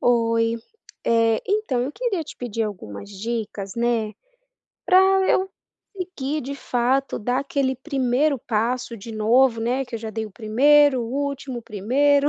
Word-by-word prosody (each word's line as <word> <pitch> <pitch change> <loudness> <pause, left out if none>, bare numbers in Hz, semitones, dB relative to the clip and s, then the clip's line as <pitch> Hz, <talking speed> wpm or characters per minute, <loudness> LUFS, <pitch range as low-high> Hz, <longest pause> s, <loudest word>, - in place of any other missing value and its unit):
Oi, 230 -1 +2 0.5
eh, 230 -1 +3
então, 400 - 0
eu 270 +4 -3
queria 455 -7 -1
te - - -11
pedir 230 -2 -3
algumas 180 - -6
dicas, 205 -2 -4
né, 235 -2 0 0.7
pra 370 - +6 0.3
eu 380 +1 +2 0.4
conseguir 310 -6 -3
de 275 +3 -5
fato 265 0 0
dar 245 +4 0
aquele 275 -2 -1
primeiro 270 +1 +1
passo 235 +2 -1
de 225 +2 -9
novo, 230 +2 +3
né, 250 +4 0
que 245 - -9
eu - - -2
já 220 0 -6
dei 220 0 -3
o - - -12
primeiro, 260 +5 +4
o 230 - -5 0.2
último, 275 -2 -5
o - - -20
primeiro, 280 +8 +2
245 Hz, 155 wpm, -23 LUFS, 225-280 Hz, 0.7 s, pra